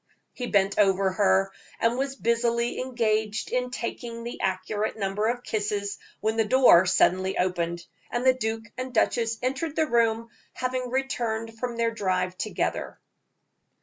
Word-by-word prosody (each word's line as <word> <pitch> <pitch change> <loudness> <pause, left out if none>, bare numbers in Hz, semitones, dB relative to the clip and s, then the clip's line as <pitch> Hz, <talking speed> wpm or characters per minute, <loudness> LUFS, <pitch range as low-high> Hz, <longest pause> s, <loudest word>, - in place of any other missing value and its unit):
He 245 - -4
bent 195 -1 +2
over 195 -1 +3
her, 195 0 +2 0.3
and 230 +1 +2
was 270 +1 -2
busily 235 0 0
engaged 220 -4 -1
in 250 0 0
taking 235 0 -5
the 235 - -6
accurate 190 +4 -1
number 200 +1 -1
of 245 +1 -1
kisses, 205 -1 -2 0.2
when 220 +1 0
the 225 - +4
door 215 -6 +6
suddenly 185 +1 +2
opened, 175 -1 -1 0.2
and 240 +1 -2
the 260 - +7
duke 225 -2 -3
and 255 -1 -5
duchess 230 0 +2
entered 275 +5 -1
the 315 - +2
room, 230 -3 +1 0.2
having 255 0 -2
returned 230 -4 -2
from 245 -1 -3
their 230 0 +1
drive 185 -4 -1
together. - - -3
225 Hz, 150 wpm, -26 LUFS, 200-245 Hz, 0.3 s, the